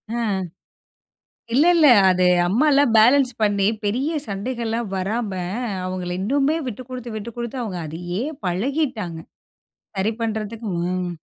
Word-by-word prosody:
ஆ. - - -1 1.4
இல்ல, 290 +6 +5
இல்ல. 315 -3 +6 0.2
அது 185 0 +2 0.2
அம்மாலாம் 275 +4 +3
பேலன்ஸ் 255 +4 +5
பண்ணி 200 -2 +2 0.2
பெரிய 255 +9 0 0.2
சண்டைகள்லாம் 230 +2 -3
வராம 205 +3 -2 0.5
அவுங்கள 185 -1 -4
இன்னுமே 280 +8 +1
விட்டுக்குடுத்து, 250 0 -7
விட்டுக்குடுத்து 235 +3 -5
அவுங்க 195 -7 -4
அதையே 175 +6 -4 0.2
பழகிட்டாங்க. 215 - -1 0.8
சரி 195 +3 +1
பண்றதுக்கு. 220 0 -3
மோம் 180 +1 -1
220 Hz, 105 wpm, -22 LUFS, 190-255 Hz, 1.4 s, இல்ல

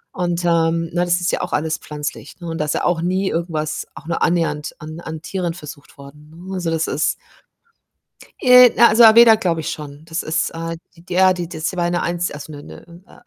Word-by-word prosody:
und, 175 -1 -2
ähm, 165 -1 +1
na, 175 0 +1
das 175 0 +1
ist 180 - 0
ja - - -2
auch 180 - -5
alles 155 +1 -1
pflanzlich, 150 +3 -7
ne, 175 - -8
und 165 - -5
da 150 - 0
ist 150 - -1
ja - - -2
auch 175 -2 +1
nie 185 +3 0
irgendwas 160 -2 -3
auch 145 +3 -12
nur 170 - -2
annähernd 165 -3 -1
an 155 +2 -9
an 160 -2 -7
Tieren 180 -1 -3
versucht 150 -4 -12
worden, 145 +2 -14
ne? 180 +4 -10
Also, 175 -2 -2
das 165 0 0
ist 150 - 0 1.3
Äh, 250 -1 +8
na 235 - +6
also 225 +3 +5
Aveda 225 0 +8
glaube 175 -7 -1
ich - - -4
schon. 150 0 -9
Das 165 0 -3
ist, 160 +1 -1
äh, 165 0 -5 0.2
d 175 +2 -10
ja, 185 +1 +5
die 175 -2 -5
das 160 -3 -6
die 185 - -8
war 175 0 0
'ne 175 0 -1
eins 175 0 -2
also 150 +1 -9
'ne 145 0 -10
'ne, - - -13 0.2
äh, - - -19
170 Hz, 230 wpm, -19 LUFS, 155-180 Hz, 1.3 s, Äh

